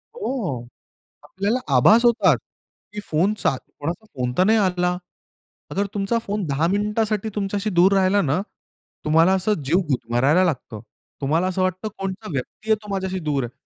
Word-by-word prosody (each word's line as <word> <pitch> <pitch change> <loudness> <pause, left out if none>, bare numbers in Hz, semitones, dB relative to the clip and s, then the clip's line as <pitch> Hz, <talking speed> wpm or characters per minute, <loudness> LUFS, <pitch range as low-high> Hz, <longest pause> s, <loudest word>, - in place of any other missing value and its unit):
हो, 205 - -3 0.6
आपल्याला 200 +6 -1 0.2
आभास 215 - +6
होतात, 240 0 +4 0.6
की 210 - -5
फोन 180 +7 +2
चा 135 - +2
कोणाचा 165 - -7
फोन 125 -1 -1
तर 185 - +5
नाही 220 +3 +4
आला. 180 -3 +1 0.7
अगर 200 +1 0
तुमचा 205 +3 0
फोन 205 0 -2
10 145 +2 +1
मिनिटासाठी 210 +2 0
तुमच्याशी 205 +1 -2
दूर 185 +3 +6
राहिला 195 +1 +3
ना, 150 +4 +1 0.6
तुम्हाला 165 +4 +4
असं 190 +3 +1
जीव 165 +7 +2
गुदमरायला 130 +8 +2
लागतं. 130 -9 -3 0.4
तुम्हाला 155 +6 +1
असं 185 0 -1
वाटतं 185 +3 -1
कोणतं 195 +2 -5
व्यक्ती 145 +11 -5
आहे, - - +7
तो 210 - -12
माझ्याशी 190 -1 -2
दूर 140 -2 +1
आहे. 120 - -7
185 Hz, 160 wpm, -22 LUFS, 155-210 Hz, 0.7 s, आहे